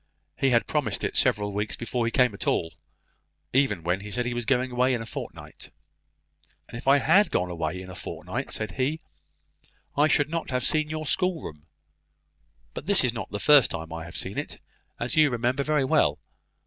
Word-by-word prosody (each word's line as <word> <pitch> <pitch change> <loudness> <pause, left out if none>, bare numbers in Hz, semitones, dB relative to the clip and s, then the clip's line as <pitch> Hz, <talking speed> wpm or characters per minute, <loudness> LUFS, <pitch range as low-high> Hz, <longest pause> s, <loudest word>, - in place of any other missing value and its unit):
He 135 - +2
had 120 -2 +3
promised - - -1
it - - -2
several 105 -1 +2
weeks 105 +1 -2
before 120 0 -2
he - - -1
came 125 -2 +3
at 100 - -6
all; 80 -1 0 0.8
even 125 -10 +2
when 90 +3 0
he 105 +1 -8
said 125 +4 -2
he 120 - -2
was 120 -2 -4
going 125 +2 +1
away 125 +1 +2
in 115 - -4
a - - -9
fortnight. - - -8 1.0
"And - - -11
if 120 - -8
I 140 +1 +7
had 175 +9 +4
gone 90 0 -1
away 85 +1 -3
in 95 - -9
a 90 - -9
fortnight," - - -5
said 110 - -3
he, 135 +5 -1 1.0
"I 145 +2 +4
should 145 -1 +2
not 165 0 -3
have 125 -1 -1
seen 155 +3 +1
your 155 0 -4
schoolroom. 150 - -2 1.1
But 150 - -8
this 200 -6 +5
is 125 -2 +1
not 115 - -5
the 105 - -4
first 145 -1 +6
time 80 0 -6
I 80 -1 -6
have 85 -2 -9
seen - - -3
it, - - -6 0.4
as 120 0 -1
you 155 -2 +5
remember 125 +2 0
very 150 -1 +1
well. - - +3
125 Hz, 200 wpm, -26 LUFS, 100-140 Hz, 1.1 s, I